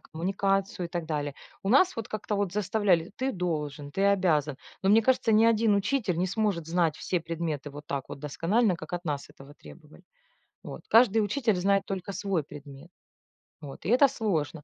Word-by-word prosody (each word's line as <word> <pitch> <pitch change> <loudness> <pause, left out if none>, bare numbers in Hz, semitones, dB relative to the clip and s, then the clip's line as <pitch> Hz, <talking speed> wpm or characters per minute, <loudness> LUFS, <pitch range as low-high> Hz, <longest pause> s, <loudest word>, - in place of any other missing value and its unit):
коммуникацию 195 +2 -1
и - - -15
так 170 -2 -4
далее. 145 -3 -3 0.3
У 195 - -3
нас 315 - +4
вот 230 0 -5
как-то 215 0 -3
вот 200 -3 -1
заставляли: 195 -4 +1
"Ты 260 +2 -1
должен, 150 -5 -3
ты 195 - 0
обязан". 160 -8 +2 0.3
Но 190 - +3
мне 220 +2 +6
кажется, 245 -1 +2
ни 215 +1 +5
один 225 -2 +3
учитель 205 -3 0
не 185 - +1
сможет 195 -4 -1
знать 165 -2 +1
все 180 - -2
предметы 160 -3 -4
вот 145 +1 -11
так 140 -2 -4
вот - - -8
досконально, 180 - +1
как 160 +1 -11
от 175 0 -5
нас 145 -3 -3
этого 140 +2 -15
требовали. 155 +2 -16 0.6
Вот. - - -8
Каждый 225 -1 +5
учитель 220 -1 0
знает 195 +2 +1
только 195 0 -5
свой 190 -6 -1
предмет. 140 +2 -12 0.7
Вот, 140 -2 -10
и - - -2
это 255 +5 +6
сложно. 165 - -2
180 Hz, 185 wpm, -28 LUFS, 155-210 Hz, 0.7 s, мне